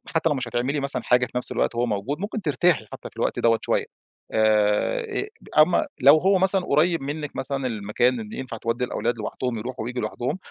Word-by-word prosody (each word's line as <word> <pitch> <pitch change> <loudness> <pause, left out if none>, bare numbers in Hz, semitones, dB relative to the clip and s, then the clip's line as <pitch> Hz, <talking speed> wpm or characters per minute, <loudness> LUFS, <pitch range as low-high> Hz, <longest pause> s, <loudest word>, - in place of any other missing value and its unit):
حتى 160 0 +2
لو 150 - +1
مش 130 -2 -3
هتعملي 125 +5 -1
مثلًا 140 -2 0
حاجة 125 0 +3
في 120 - -15
نفس 125 - +1
الوقت - - 0
وهو 120 +1 +1
موجود، 115 +7 -3
ممكن 210 +3 -4
ترتاحي 160 - +2
حتى - - -8
في - - -30
الوقت - - -1
دوَّة 115 -1 +3
شوية، - - 0 0.5
آآ، 110 - +2 0.5
أمّا 160 +3 +5 0.2
لو 140 +4 +8
هو 190 +4 +3
مثلًا 190 +1 +3
قريب 165 +3 +2
منك 150 +1 -5
مثلًا 135 -1 -2
المكان 115 +3 0
إن 110 -1 -8
ينفع 130 -3 -6
تودّي 115 +2 -1
الأولاد 120 -1 -2
لوحدهم 120 +2 -3
يروحوا 125 +2 -5
وييجوا 125 +1 -3
لوحدهم، 120 +8 -3
125 Hz, 200 wpm, -24 LUFS, 115-150 Hz, 0.5 s, لو